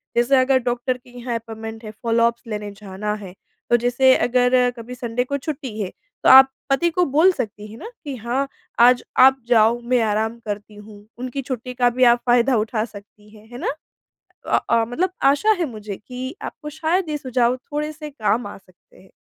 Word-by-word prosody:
जैसे 240 +3 +3
अगर 260 0 +3
डॉक्टर 245 +1 -1
के 250 0 -21
यहाँ 240 -1 -3
अपॉइंटमेंट 225 0 -7
है, 215 - -7
फ़ॉलोअप्स 230 +1 0
लेने 210 -1 -4
जाना 200 +1 -5
है, 180 -1 -9 0.4
तो 240 - +5
जैसे 245 +2 +4
अगर 250 0 +3
कभी 235 +2 -8
संडे 240 0 -2
को 280 +2 -3
छुट्टी 270 -6 -6
है, 185 - -4 0.3
तो - - +5
आप 265 0 +9 0.2
पति 340 +6 +2
को 355 +1 +1
बोल 315 +7 +4
सकती 210 -4 -5
हैं 225 - -11
ना, 445 - -8
कि 285 -3 -5
हाँ 250 +4 -2 0.3
आज 245 +1 +6 0.2
आप 265 +1 +6
जाओ, 230 0 +4
मैं 245 0 +1
आराम 220 +1 -1
करती 210 0 -6
हूँ। 210 0 -13
उनकी 255 +2 -4
छुट्टी 250 -1 -5
का 245 0 +3
भी 250 +2 0
आप 240 - -3
फ़ायदा 245 +1 +3
उठा 220 +1 -1
सकती 210 -1 -15
हैं, 215 +1 -18
है 240 - -8
ना? - - -2 0.8
अ - - +3
अ, 230 -1 +4
मतलब 345 +10 -1
आशा 285 +10 +4
है 340 - 0
मुझे 210 -3 -7
कि 255 +6 -7
आपको 300 -1 -7
शायद 320 +3 -1
ये 300 - -1
सुझाव 250 -2 +1
थोड़े-से 300 +3 -6
काम 225 -3 -1
आ 205 - -8
सकते 185 -2 -25
हैं। 190 - -20
245 Hz, 195 wpm, -21 LUFS, 220-265 Hz, 0.8 s, आप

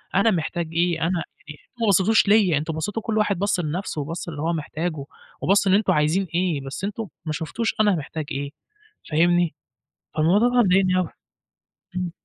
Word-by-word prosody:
أنا 215 +3 +4
محتاج 170 -1 -2
إيه، 170 0 +1
أنا 170 +1 0 0.2
يعني 150 -1 -10
أنتم 240 - -17
ما 225 - +2
بصّيتوش 200 +2 +4
ليّا، 200 -7 +4
أنتم 155 +2 -3
بصّيتوا 205 +8 -3
وكل 220 +1 -2
واحد 205 -4 +1
بَص 200 -2 +1
لنَفْسه 160 -1 -3
وبَص 165 +4 -5
للي 145 -3 -6
هو 165 +2 0
محتاجه 155 -1 -3 0.4
وبَص 195 +1 +3
إن 190 - +4
أنتم 210 +1 +3
عايزين 155 +6 +1
إيه، 175 -5 +1
بس 135 +7 -7
أنتم 210 +1 -3 0.2
ما 155 - -2
شُفتوش 175 +9 -2
أنا 205 -3 +4
محتاج 155 0 -5
إيه 140 +1 -3 0.6
فاهمني، 175 0 +3 0.6
فالموضوع 185 +10 +3
ده 245 - -3
بقى 240 -2 +5
مضايقني 185 0 +3
أوي. 180 -4 0 0.9
إمم. 180 -1 -2
175 Hz, 185 wpm, -23 LUFS, 155-200 Hz, 0.9 s, بقى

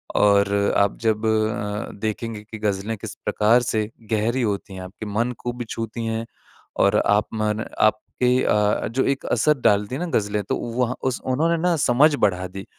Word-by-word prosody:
और 100 -1 +4 0.2
आप 100 0 +2
जब 110 -1 0
अ, 110 -1 -1
देखेंगे 110 0 -3
कि 110 +1 -9
ग़ज़लें 105 +1 -1
किस - - -8
प्रकार 115 +4 +3
से 110 -3 -1 0.2
गहरी 115 +4 +1
होती 100 -3 -2
हैं 95 - -7
आपके 95 +4 -8
मन 110 +4 -1
को 120 0 -4
छूती 115 0 -5
हैं, 115 0 -2 0.5
और - - +3
आप 105 +1 +3
मन 110 0 -1
आपके 125 +4 +2
अ, 105 0 +2
जो 125 +5 0
एक 135 0 -1
असर 150 -1 +2
डालती 105 +3 +2
है 140 - -4
ना 180 - -2
ग़ज़लें 105 0 -1
तो - - +1 0.2
वहाँ 125 0 +1
उस 130 -2 -1
उन्होंने 160 +6 +1
ना 175 0 +2
समझ 140 +5 +5
बढ़ा 95 -7 +1
दी 95 +2 -8
110 Hz, 180 wpm, -23 LUFS, 105-120 Hz, 0.5 s, समझ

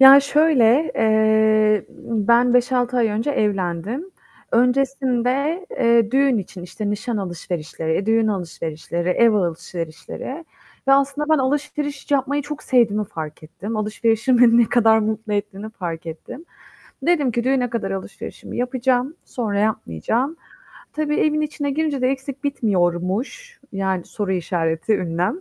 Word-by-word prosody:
Ya 270 +1 +10
şöyle, 290 -2 +3
eee, 220 -1 +3 0.2
ımm, 220 -1 -1
ben 245 +1 +5
5-6 250 0 +2
ay 230 -2 +3
önce 220 +6 -1
evlendim. 210 - -2 0.4
Öncesinde, 265 +5 +1
eee, 235 - +3
düğün 270 -3 +3
için, 185 -2 -7
işte, 205 +3 -4
nişan 220 +3 -3
alışverişleri, 170 -4 -4
eee, 195 - -1
düğün 225 0 +3
alışverişleri, 170 -2 -4
ev 230 +5 +4
alışverişleri 175 - -4 0.4
ve - - +7
aslında 280 +2 +2
ben - - +2
alışveriş 290 +1 -2
yapmayı 280 +1 +1
çok 295 +1 -7
sevdiğimi 215 -5 +2
fark 155 -4 -8
ettim. 205 +8 -6
Alışverişin 225 +3 +1
beni 235 -1 +6
ne 235 - +4
kadar 225 -2 +4
mutlu 215 0 -2
ettiğini 205 +1 -3
fark 170 -5 -6
ettim. 245 - -8 0.6
Dedim 300 -4 +2
ki, 235 +1 -1
"Düğüne 255 -2 +1
kadar 205 -5 -3
alışverişimi 195 -1 -7
yapacağım, 250 +3 0
sonra 215 -5 -3
yapmayacağım." 220 - -1 0.6
Tabii 300 -1 -1
evin 305 0 +2
içine 290 -1 -2
girince 295 -1 -1
de 255 - +3
eksik 270 +1 -4
bitmiyormuş, 210 - -1
yani 190 -2 -1
"?!" 180 - -1
230 Hz, 130 wpm, -21 LUFS, 195-270 Hz, 0.6 s, Ya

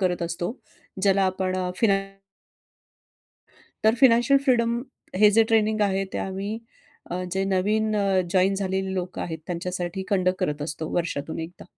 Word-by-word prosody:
करत 180 -2 0
असतो. 175 +6 -3 0.5
ज्याला 195 0 +4
आपण 185 0 -1
अ, 180 -1 -1
फिनान 195 -2 +1 1.7
तर 220 +1 +5
फिनॅन्शियल 250 +1 +6
फ्रीडम 235 -3 +2 0.4
हे 210 0 +7
जे 225 - +7
ट्रेनिंग 220 -1 +2
आहे 195 0 0
ते - - -2
आम्ही 195 +2 -3 0.6
अ, 180 +1 -2
जे 190 0 +1
नवीन 215 +3 +1
अ, 195 -2 +2
जॉइन 190 +1 +4
झालेली 190 -1 -2
लोकं 180 -1 -4
आहेत 160 -2 -4
त्यांच्यासाठी 180 +1 -3
कंडक्ट 185 -1 +2
करत 150 0 -1
असतो 155 +1 -4
वर्षातून 165 -3 -2
एकदा. 175 - -15
190 Hz, 150 wpm, -25 LUFS, 180-210 Hz, 1.7 s, हे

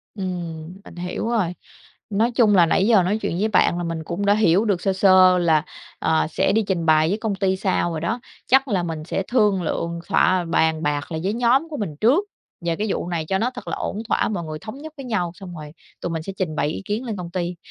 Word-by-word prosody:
Ừm, 175 -4 -5
mình - - -12
hiểu 180 +5 -4
rồi. 205 -8 0 0.6
Nói 220 +4 +1
chung 225 -4 +4
là 175 -2 +6
nãy 190 +5 +2
giờ 215 -6 +5
nói 195 +4 0
chuyện 170 - -2
với 215 - +2
bạn 195 -4 +3
là 175 - -2
mình 165 -1 -3
cũng 175 +5 -3
đã 200 - +5
hiểu 210 -1 +3
được 195 -5 0
sơ 195 - +1
sơ 185 -1 +6
là, 160 -3 +3 0.4
ờ, 160 -1 +1
sẽ - - +1
đi 220 +1 +2
trình 175 -4 -1
bày 155 0 +4
với 200 - 0
công 220 -2 -2
ty 190 -1 +1
sao 185 -2 0
rồi 160 -2 -4
đó, 220 +9 -1 0.3
chắc 270 +2 +4
là 195 -7 0
mình 165 -2 -4
sẽ 195 - -2
thương 210 -6 +3
lượng, 170 0 -2
thỏa 185 -1 +3
bàn 160 -1 +1
bạc 145 +1 -2
lại 160 -1 -3
với 195 +3 0
nhóm 245 +6 +2
của 300 - -5
mình 200 - -4
trước 285 - +4 0.4
về 170 -1 +1
cái 215 +5 -2
vụ - - -3
này 165 -3 -2
cho 190 - +1
nó 240 +5 0
thật 245 - -9
là - - -2
ổn 210 - -4
thỏa, - - +1
mọi 190 -5 -3
người 155 -1 -6
thống 220 +8 -8
nhất 310 +2 -9
với 275 - -7
nhau 195 -8 -1
xong 180 -2 -9
rồi 150 -2 -9 0.3
tụi - - -3
mình 160 -1 -3
sẽ 195 - -6
trình 165 -5 -2
bày - - 0
ý 160 - -5
kiến 215 +6 -2
lên 220 -4 -4
công 175 -2 -6
ty. 175 0 -3
185 Hz, 260 wpm, -22 LUFS, 170-215 Hz, 0.6 s, là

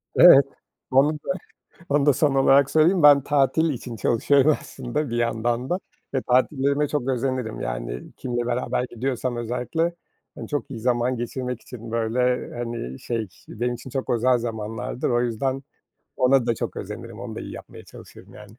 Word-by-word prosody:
Evet, 140 0 +9 0.5
onu 140 +3 +4
da 215 - -3 0.6
onu 145 0 +2
da 145 - +7
son 140 +1 +1
olarak 135 0 +5
söyleyeyim. 165 +3 +4
Ben 145 -1 +8
tatil 145 +3 +2
için 120 -3 -6
çalışıyorum 140 +7 +3
aslında 130 +1 -4
bir 120 - -2
yandan 120 +2 -1
da 180 - +1 0.4
ve 135 - 0
tatillerime 140 +3 +2
çok 135 -3 -2
özenirim. 130 -3 -2
Yani, - - -5
kiminle 120 -1 -3
beraber 125 +1 -1
gidiyorsam 125 0 -2
özellikle, 125 +9 -2 0.4
hani, - - -8
çok 145 -4 -3
iyi 115 -4 -6
zaman 125 +1 +1
geçirmek 125 0 -4
için, 115 -2 -10
böyle, 120 +2 0
hani, 115 - -5
şey, 115 -3 -3 0.2
benim 120 +2 -2
için 125 +2 -9
çok 130 +1 -3
özel 125 +1 +3
zamanlardır. 115 +1 -3
O 120 0 +2
yüzden 130 +3 -1 0.5
ona 130 -1 +3
da 120 - +2
çok - - -5
özenirim, - - -7
onu - - -6
da - - -6
iyi - - -7
yapmaya - - -11
çalışırım, - - -14
yani. - - -13
125 Hz, 165 wpm, -24 LUFS, 120-135 Hz, 0.6 s, Evet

